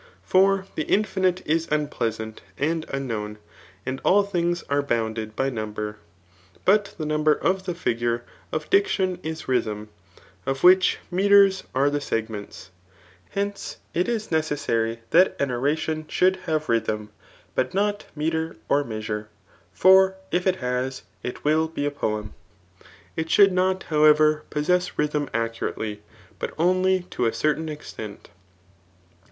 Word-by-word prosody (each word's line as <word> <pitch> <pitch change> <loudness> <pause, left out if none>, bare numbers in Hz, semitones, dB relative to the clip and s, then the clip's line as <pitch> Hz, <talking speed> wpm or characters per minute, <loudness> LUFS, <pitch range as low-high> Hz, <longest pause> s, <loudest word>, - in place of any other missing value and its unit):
For 190 +1 +3
the 155 - -2
infinite 190 -3 +1
is 165 +2 +1
unpleasant 115 -7 -2 0.2
and 160 +2 -1
unknown; 110 -6 -3 0.5
«id 130 +1 -3
all 200 +2 +5
things 175 -3 -1
are 140 0 +2
bounded 110 -4 -2
by 135 +3 0
number. 105 -2 -4 0.7
But 200 +1 +3
the 155 - -3
number 150 0 +3
of 185 +4 0
the 180 -2 -2
figui^e 120 -6 -1 0.3
of 155 -1 -3
diction 190 -2 +2
is 160 0 -5
rythm, 105 -4 -1 0.6
of 135 0 -2
which 185 +1 +6
metres 195 +1 +5
are 140 +2 +3
the 145 0 -1
segments* 110 -6 -4 0.6
Hence, 200 0 -3 0.2
it 180 - +1
is 220 -4 -2
necessary 140 -8 0
that 180 +3 +5
an 140 -2 0
oration 155 +5 -1
should 185 +3 +2
hsnre 155 -1 0
rythm, 110 -2 0 0.4
but - - -1
not 205 +1 0
metre 160 +1 -1
or 145 +1 +3
measure; 110 -2 -4 0.4
for 190 - +6 0.2
if 180 +2 +1
it 185 - +3
ha% 125 +1 -2 0.2
it 125 - -4
trill 155 +2 +3
bi» 160 -3 -4
a 145 - 0
poefti. 110 -6 -2 0.9
It 160 0 -2
skHild 200 +3 +6
n<>C9 185 +1 +1
however, 155 0 +4
possess 180 +4 +1
ryfhm 150 -1 0
sKurately, 115 -2 -3 0.4
but - - -5
oHljr 185 +2 +2
to 120 - 0
a - - +1
cettaih 155 +6 0
extent. 110 -8 -8
150 Hz, 135 wpm, -24 LUFS, 115-180 Hz, 0.9 s, which